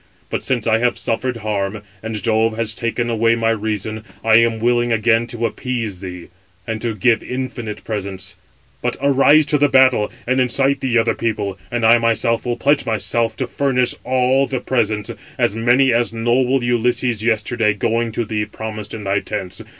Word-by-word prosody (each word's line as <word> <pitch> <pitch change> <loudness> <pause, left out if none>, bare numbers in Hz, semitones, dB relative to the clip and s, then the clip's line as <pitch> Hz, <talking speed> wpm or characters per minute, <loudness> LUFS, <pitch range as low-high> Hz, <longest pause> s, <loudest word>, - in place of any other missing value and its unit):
But - - -2
since 120 -4 0
I 110 -1 +3
have 120 +1 +1
suffered 120 +2 -1
harm, 105 0 -2 0.2
and 110 -1 -5
Jove 110 -1 +1
has 115 -2 +1
taken 115 +2 -2
away 115 0 +2
my 115 -1 +1
reason, 110 0 -3 0.2
I 110 0 +5
am 115 -1 +2
willing 120 +1 +1
again 115 +1 +2
to 120 0 -3
appease 115 -6 -3
thee, 90 -3 -8 0.4
and 110 +1 -4
to 115 -2 -2
give 115 +3 +2
infinite 125 -4 -5
presents. 95 -3 -5 0.5
But - - -2
arise 140 +2 +4
to 150 0 +1
the 145 0 +4
battle, 130 -5 +4
and 130 +1 +1
incite 135 +2 +1
the 125 -3 0
other 115 - +2
people, 105 -4 -3
and 120 -1 -1
I 115 +1 +6
myself 115 +1 0
[will 120 -1 -1
pledge 140 +3 +2
myself] 115 0 0
to 130 - -2
furnish 125 -1 0
all 130 +2 +2
the 130 - -2
presents, 110 -4 -1 0.3
as - - +2
many 120 +3 +3
as 120 0 +1
noble 120 +3 +1
Ulysses 120 -1 0
yesterday, 110 -1 +1
going 115 +3 0
to 115 - -2
thee, 105 0 -2
promised 110 0 -7
in 110 - -7
thy 100 0 +1
tents. 95 -3 -5
115 Hz, 180 wpm, -19 LUFS, 110-125 Hz, 0.5 s, I